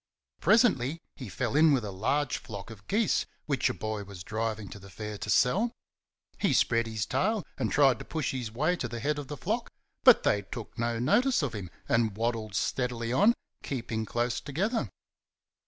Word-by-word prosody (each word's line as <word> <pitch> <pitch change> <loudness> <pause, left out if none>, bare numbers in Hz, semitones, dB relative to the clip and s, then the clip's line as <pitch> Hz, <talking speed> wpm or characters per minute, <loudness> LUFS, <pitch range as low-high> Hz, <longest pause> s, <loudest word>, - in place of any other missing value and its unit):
Presently 165 - +3 0.2
he 125 -7 -8
fell 115 - -2
in 155 0 +6
with 125 -5 +1
a 100 - -4
large 130 +9 0
flock 105 0 -8
of 105 -2 -13
geese 215 +1 +1 0.2
which 140 -5 +1
a - - -1
boy 110 -1 -3
was 95 -3 -9
driving 110 0 -3
to 100 - -9
the 100 0 -13
Fair 105 +2 -6
to - - -5
sell. 195 - +3 0.7
He 195 - +2
spread 115 -2 +3
his 110 -1 -2
tail 215 - 0
and - - -1
tried 135 -5 +4
to - - -8
push 155 -5 -2
his 125 -4 -3
way 155 +10 +1
to 130 - -2
the 120 0 -5
head 145 +5 0
of 145 - -6
the 145 +1 -6
flock, - - -2 0.3
but - - +8
they 105 - +3
took 105 +3 -8
no 115 0 -1
notice 240 - +3
of 135 - -2
him 100 -5 -5 0.2
and 115 -3 +1
waddled 115 -3 -2
steadily 120 +2 -1
on, 210 - +5 0.3
keeping 115 -4 -3
close 120 +1 0
together. 205 - -1
120 Hz, 190 wpm, -29 LUFS, 110-145 Hz, 0.7 s, but